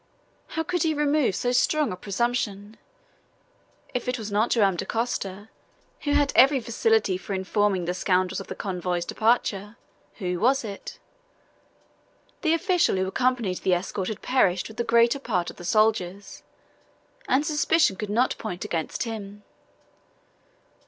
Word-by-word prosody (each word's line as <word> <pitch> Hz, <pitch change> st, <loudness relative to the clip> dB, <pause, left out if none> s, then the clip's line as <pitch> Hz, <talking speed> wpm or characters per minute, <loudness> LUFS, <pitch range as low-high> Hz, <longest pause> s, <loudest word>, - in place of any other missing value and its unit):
How 320 Hz, -, +1 dB
could 355 Hz, +1 st, -2 dB
he 315 Hz, -1 st, +1 dB
remove 295 Hz, -7 st, +2 dB
so 245 Hz, -, 0 dB
strong 285 Hz, +2 st, +2 dB
a -, -, -3 dB
presumption? 205 Hz, +1 st, -2 dB, 1.2 s
If 250 Hz, -, -3 dB
it 250 Hz, 0 st, 0 dB
was 215 Hz, -2 st, -6 dB
not 215 Hz, +3 st, +2 dB
Joam 200 Hz, -5 st, +3 dB
Dacosta, 205 Hz, -1 st, -3 dB, 0.5 s
who 290 Hz, -, -1 dB
had 290 Hz, -1 st, +2 dB
every 270 Hz, +2 st, +6 dB
facility 220 Hz, -5 st, +1 dB
for 195 Hz, -, -4 dB
informing 190 Hz, -1 st, 0 dB
the 175 Hz, -, -1 dB
scoundrels 185 Hz, 0 st, 0 dB
of -, -, -8 dB
the -, -, -6 dB
convoy's 180 Hz, -2 st, -2 dB
departure, 215 Hz, -1 st, 0 dB, 0.4 s
who 180 Hz, -4 st, -3 dB
was 265 Hz, +5 st, +3 dB
it? 200 Hz, -3 st, -7 dB, 1.4 s
The 325 Hz, -2 st, +3 dB
official 355 Hz, -, +2 dB
who 190 Hz, 0 st, 0 dB
accompanied 230 Hz, -2 st, 0 dB
the 185 Hz, -, +2 dB
escort 185 Hz, +1 st, -3 dB
had 215 Hz, -, -5 dB
perished 190 Hz, -9 st, +2 dB
with 220 Hz, -, -13 dB
the 235 Hz, -, 0 dB
greater 235 Hz, +3 st, +3 dB
part 185 Hz, -10 st, -1 dB
of -, -, -19 dB
the -, -, -10 dB
soldiers, 200 Hz, -2 st, 0 dB, 0.9 s
and 280 Hz, +3 st, +2 dB
suspicion 305 Hz, -6 st, +2 dB
could 210 Hz, +2 st, -5 dB
not 235 Hz, +5 st, +2 dB
point 180 Hz, -5 st, -5 dB
against 160 Hz, -2 st, -2 dB
him. 205 Hz, -3 st, -7 dB
220 Hz, 145 wpm, -25 LUFS, 190-250 Hz, 1.4 s, every